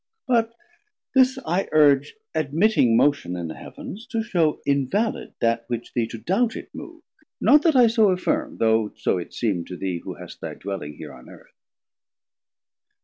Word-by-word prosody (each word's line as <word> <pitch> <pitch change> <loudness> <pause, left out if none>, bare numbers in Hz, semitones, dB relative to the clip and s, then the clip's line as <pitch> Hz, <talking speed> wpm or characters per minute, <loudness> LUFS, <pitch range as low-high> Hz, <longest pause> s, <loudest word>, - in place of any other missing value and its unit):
But 230 -3 +1 0.6
this 260 0 +4
I 180 +4 -1
urge, 145 - +4 0.2
Admitting 155 - +2
Motion 140 -11 +2
in 85 -2 -4
the - - -5
Heav'ns, 220 +5 -10
to 230 -3 -2
shew 170 -8 +1
Invalid 140 - -1
that 115 0 +1
which 120 -1 -5
thee 115 -2 0
to 115 - -7
doubt 200 - 0
it - - -9
mov'd; - - -10 0.4
Not 295 - +6
that 320 -2 +2
I 250 -2 +7
so 220 -2 +4
affirm, 300 +12 -1
though 110 -1 +2
so 90 - 0
it 85 - -8
seem 100 -8 -1
To 90 - -8
thee 90 -2 -3
who - - -8
hast - - -11
thy - - -6
dwelling 95 -7 -6
here - - -9
on - - -14
Earth. - - -16
150 Hz, 170 wpm, -23 LUFS, -, 0.6 s, I